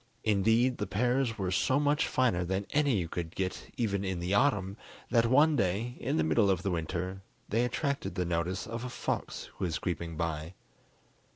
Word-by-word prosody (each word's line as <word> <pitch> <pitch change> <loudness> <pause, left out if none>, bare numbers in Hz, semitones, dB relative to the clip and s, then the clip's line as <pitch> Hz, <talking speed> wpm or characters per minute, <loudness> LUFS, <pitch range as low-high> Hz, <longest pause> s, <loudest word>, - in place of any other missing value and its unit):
Indeed, 115 +4 +3
the 105 - -2
pears 125 +2 +1
were 95 -3 -1
so 130 +8 +2
much 145 +1 +2
finer 115 -9 +2
than 95 +3 -2
any 145 -4 +3
you 85 -3 -1
could 85 0 -5
get 95 -1 -3
even 100 -5 0
in 95 -2 -2
the 90 +3 -1
autumn, 100 -6 +2 0.4
that 115 -1 +4
one 145 +5 +5
day, 110 +3 0
in - - -1
the 80 - +3
middle 80 +6 +3
of 95 -2 +1
the 100 - 0
winter, 90 +3 -3 0.3
they 115 +3 +2
attracted 140 +3 -2
the 90 -2 0
notice 85 +2 -1
of 115 +1 -5
a 125 - -4
fox - - -4
who - - 0
was 80 -2 -1
creeping 85 -2 -3
by. 80 +1 -3
100 Hz, 190 wpm, -30 LUFS, 90-120 Hz, 0.4 s, one